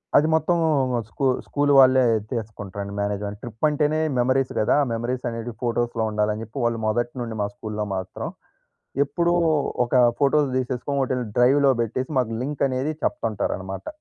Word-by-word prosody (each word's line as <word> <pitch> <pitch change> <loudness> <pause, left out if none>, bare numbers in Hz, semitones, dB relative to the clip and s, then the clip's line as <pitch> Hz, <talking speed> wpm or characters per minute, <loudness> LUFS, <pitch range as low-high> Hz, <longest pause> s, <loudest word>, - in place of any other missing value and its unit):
అది 150 - +6
మొత్తం 160 +2 +2 0.3
మ్ - - -1
స్కూ 140 - -3 0.2
స్కూల్ 145 0 +1
వాళ్ళే 130 -1 +7 0.3
తీసుకుంటారండి 100 -3 -5
మేనేజ్ 100 0 -1
అని 100 0 -6
ట్రిప్ 120 +4 -3
అంటేనే 150 +1 +1 0.2
మెమరీస్ 130 +1 +2
గదా! 110 - +3
ఆ - - -1
మెమరీస్ 125 +3 -3
అనేటివి 115 0 -6
ఫోటోస్‌లో 120 -1 0
ఉండాలని 105 0 0
జెప్పి 115 +5 -7
వాళ్ళు 115 -1 0
మొదటి 120 +2 0
నుండి 115 -2 -5
మా 100 - 0
స్కూల్‌లో 105 0 -4
మాత్రం 95 0 -5 0.8
ఎప్పుడూ 170 +4 0 0.5
ఒక 120 - -2 0.3
ఫోటోలు 140 0 +3
తీసేసుకొని 130 +2 -2
వోటిల్ని 125 -2 -1
డ్రైవ్‌లో 135 +3 +5
పెట్టేసి 130 +6 -3
మాకు 115 -2 -1
లింక్ 145 +1 -2
అనేది 130 +4 -1
చెప్తుంటారనమాట. 95 -3 -2
120 Hz, 155 wpm, -23 LUFS, 110-135 Hz, 0.8 s, వాళ్ళే